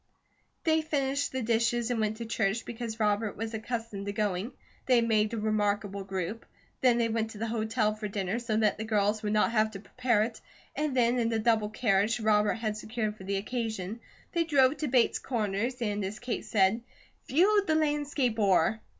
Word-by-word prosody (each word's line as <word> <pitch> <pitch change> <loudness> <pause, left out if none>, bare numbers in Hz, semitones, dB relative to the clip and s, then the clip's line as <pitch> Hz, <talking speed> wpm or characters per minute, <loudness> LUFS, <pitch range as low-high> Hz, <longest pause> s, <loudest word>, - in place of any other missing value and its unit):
They 320 -1 +3
finished 285 -2 -1
the 260 -1 -2
dishes 235 +1 +1
and 235 - 0
went 215 0 0
to 230 - -5
church, 220 -1 -1
because 230 -1 -5
Robert 210 0 0
was 225 +2 -4
accustomed 220 -2 -4
to - - -1
going. 205 +1 -1 0.4
They 250 -2 +5
made 220 -2 +2
a 230 - -3
remarkable 205 -2 0
group. 190 +3 -4 0.4
Then 250 -2 +4
they 235 -1 +2
went 225 0 -1
to 225 - -10
the 225 - -2
hotel 220 -1 0
for 215 0 -5
dinner, 195 +2 -2
so 230 -3 -1
that 215 -1 +2
the - - -2
girls 210 -1 +1
would 210 - -2
not 215 +2 +3
have 215 -1 +2
to 195 - -6
prepare 235 +1 +1
it, 225 0 -5 0.3
and 290 -2 -1
then 245 0 +3
in 230 -1 +1
a 225 - +1
double 220 -1 +2
carriage 215 0 +1
Robert 210 -1 +3
had 215 -2 -3
secured 215 -1 -3
for 190 - -11
the 195 0 -1
occasion, 220 -1 -3 0.3
they 340 -1 +1
drove 285 -3 +3
to 305 - -2
Bates 245 -2 +3
Corners 230 +1 -2
and 205 -2 -1
as 195 +3 -4
Kate 245 0 -4
said, 200 +2 +2 0.5
"Viewed 400 +7 +3
the 315 - +3
landscape 290 -6 0
o'er." 195 +1 +3
220 Hz, 195 wpm, -29 LUFS, 210-240 Hz, 0.5 s, They